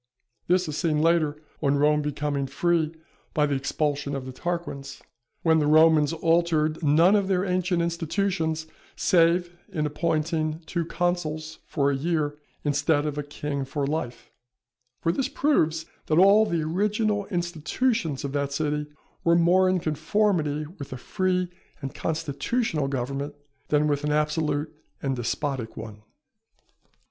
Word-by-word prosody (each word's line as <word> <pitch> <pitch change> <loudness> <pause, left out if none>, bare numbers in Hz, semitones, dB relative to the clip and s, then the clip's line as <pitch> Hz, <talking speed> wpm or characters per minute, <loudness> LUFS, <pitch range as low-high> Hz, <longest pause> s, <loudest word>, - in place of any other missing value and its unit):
This 180 0 +3
is 150 - -4
seen 155 -2 +1
later, 155 -2 +2 0.2
on 140 -1 +2
Rome 150 +1 +3
becoming 145 -1 -2
free 160 +3 +1 0.4
by 150 - +4
the 145 - -1
expulsion 140 +1 -1
of 135 -1 -4
the 130 - -6
Tarquins, 170 -2 -5 0.4
when 160 -1 +4
the 150 - +1
Romans 155 -1 +5
altered 165 -1 +1
none 165 +6 +5
of 200 -2 +2
their 190 -1 +1
ancient 180 -2 +1
institutions 165 -1 -1 0.3
save 175 0 +3 0.2
in 155 -3 -1
appointing 155 +1 -1
two 170 +1 -2
consuls 160 -3 -2
for 140 -2 +1
a - - 0
year 150 0 -1 0.2
instead 145 +1 +1
of 150 -1 -2
a - - 0
king 145 -1 -4
for 140 +1 -2
life; 140 -4 -4 0.7
for 165 - +3
this 270 +9 -1
proves 160 - +1 0.2
that 155 - +2
all 200 +4 +6
the 165 -2 0
original 205 +4 0
institutions 175 - -1
of 140 - -3
that 140 0 -1
city 150 0 -1 0.4
were 170 0 +4
more 180 +2 +4
in 185 0 +2
conformity 155 -1 0
with 140 - -7
a 130 - -5
free 185 +6 0 0.3
and 135 - -5
constitutional 160 - -1
government, 135 +2 -3 0.3
than 150 0 +2
with 145 -1 0
an 150 - 0
absolute 150 0 0 0.2
and 135 -1 -1
despotic 125 0 -3
one. 105 -2 -8
155 Hz, 145 wpm, -26 LUFS, 145-175 Hz, 0.7 s, all